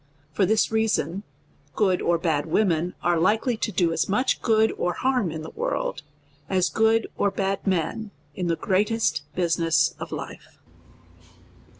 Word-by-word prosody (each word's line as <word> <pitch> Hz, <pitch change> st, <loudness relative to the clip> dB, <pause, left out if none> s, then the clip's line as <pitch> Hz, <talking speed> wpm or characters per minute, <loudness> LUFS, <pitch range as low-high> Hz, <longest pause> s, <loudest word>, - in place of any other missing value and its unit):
For 185 Hz, +5 st, +1 dB
this 220 Hz, +1 st, +2 dB
reason, 205 Hz, -5 st, 0 dB, 0.5 s
good 190 Hz, -4 st, +2 dB
or 170 Hz, 0 st, +2 dB
bad, 160 Hz, -3 st, -1 dB
women 175 Hz, -1 st, +1 dB
are 175 Hz, -1 st, +2 dB
likely 220 Hz, +7 st, +2 dB
to 220 Hz, -, -2 dB
do 175 Hz, -3 st, +1 dB
as -, -, -1 dB
much 250 Hz, +7 st, +1 dB
good 220 Hz, -1 st, +3 dB
or 175 Hz, -, -1 dB
harm 255 Hz, -6 st, 0 dB
in 155 Hz, 0 st, -6 dB
the -, -, -8 dB
world, -, -, -2 dB, 0.5 s
as 185 Hz, -2 st, +1 dB
good 225 Hz, 0 st, +3 dB
or 200 Hz, -, +2 dB
bad 195 Hz, 0 st, -2 dB
men 190 Hz, +4 st, -1 dB, 0.2 s
in 180 Hz, +3 st, -3 dB
the 165 Hz, -, +1 dB
greatest 210 Hz, +2 st, +1 dB
business 170 Hz, -2 st, +2 dB
of -, -, -7 dB
life. -, -, -8 dB
190 Hz, 155 wpm, -24 LUFS, 170-220 Hz, 0.5 s, good